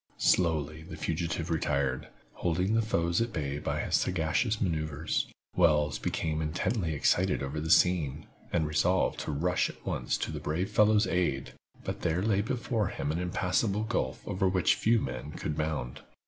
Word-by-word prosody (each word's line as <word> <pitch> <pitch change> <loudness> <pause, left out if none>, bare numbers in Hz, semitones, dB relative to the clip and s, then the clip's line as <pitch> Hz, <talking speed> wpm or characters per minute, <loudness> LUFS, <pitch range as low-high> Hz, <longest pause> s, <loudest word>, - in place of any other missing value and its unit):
Slowly 80 -3 +2
the 80 0 -9
fugitive 80 +1 -2
retired, 70 -5 0 0.3
holding 90 +4 0
his 115 0 +2
foes 85 -3 +1
at 115 0 -1
bay 75 -4 -3
by - - -2
his - - 0
sagacious 95 +6 0
maneuvers. 75 -4 -1 0.3
Wells 75 -4 +3
became 80 -1 -1
intensely 80 +2 -1
excited 90 +4 +2
over 70 +3 -3
the 80 - -4
scene, 80 -5 +3 0.3
and 85 -3 +1
resolved 85 +5 +1
to - - -3
rush 85 +5 +1
at - - -13
once - - -1
to - - -3
the - - -4
brave 85 +5 -2
fellow's 105 0 +4
aid, 85 -7 -1 0.3
but - - -4
there 85 +2 0
lay 105 -2 +2
before 115 -2 -1
him 70 - -3
the 80 +3 -1
impassable 95 +4 0
gulf 65 -11 -2
over 95 0 +1
which 90 -3 +3
few 115 +1 +2
men 65 - -5
could 75 -2 -3
bound. 75 -6 -3
85 Hz, 165 wpm, -30 LUFS, 75-95 Hz, 0.3 s, fellow's